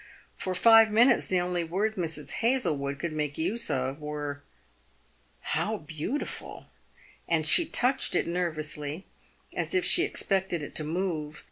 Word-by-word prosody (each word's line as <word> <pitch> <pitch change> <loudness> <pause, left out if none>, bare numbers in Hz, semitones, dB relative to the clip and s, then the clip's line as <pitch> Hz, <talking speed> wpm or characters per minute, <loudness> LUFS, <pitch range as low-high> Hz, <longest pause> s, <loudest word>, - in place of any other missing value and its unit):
For 185 -1 -3
five 225 +3 +7
minutes 240 +3 +4
the 185 - +2
only 175 -1 -1
words 200 +6 -1
Mrs. 160 -5 -3
Hazlewood 150 - 0
could 165 +2 -4
make 150 -2 -3
use 220 +9 -1
of 130 +2 -1
were, 145 -1 -5 0.5
" - - -37 0.2
How 215 +1 0
beau 155 - -4
tiful!" - - -5 0.6
and 160 -2 +1
she 325 - +6
touched 260 -6 +1
it - - +2
nervously, 155 -2 -3 0.5
as - - -2
if 365 -2 +2
she 350 - +4
expected 190 - -1
it - - -8
to 155 - -1
move. 155 -2 -3
170 Hz, 150 wpm, -28 LUFS, 150-215 Hz, 0.6 s, five